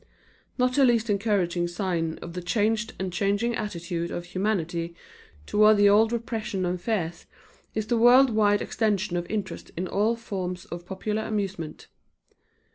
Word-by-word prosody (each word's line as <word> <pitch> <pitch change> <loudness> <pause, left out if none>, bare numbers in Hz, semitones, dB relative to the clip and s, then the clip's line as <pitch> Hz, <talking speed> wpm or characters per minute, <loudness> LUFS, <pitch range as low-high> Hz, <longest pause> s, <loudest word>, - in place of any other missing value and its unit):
Not 250 -1 +2
the 275 - +4
least 230 -3 +3
encouraging 195 -4 +1
sign 175 -3 -2
of 170 - -8
the 180 - -4
changed 220 +4 0
and 190 -2 -4
changing 205 +5 0
attitude 170 -5 -3
of 175 - -5
humanity 175 -3 -2 0.5
toward 215 - +5
the 205 0 +6
old 220 +2 +5
repressions 220 -5 -2
and 180 0 -2
fears, 175 -6 -2 0.5
is 215 -1 -1
the 235 +1 +1
world 250 +2 +7
wide 205 -1 +3
extension 210 -4 0
of 175 0 -3
interest 200 -5 -4
in 180 +2 -2
all 215 +5 +1
forms 185 -6 -5
of 175 +1 -8
popular 210 +3 -2
amusement. 195 -7 -4
200 Hz, 150 wpm, -26 LUFS, 175-220 Hz, 0.5 s, world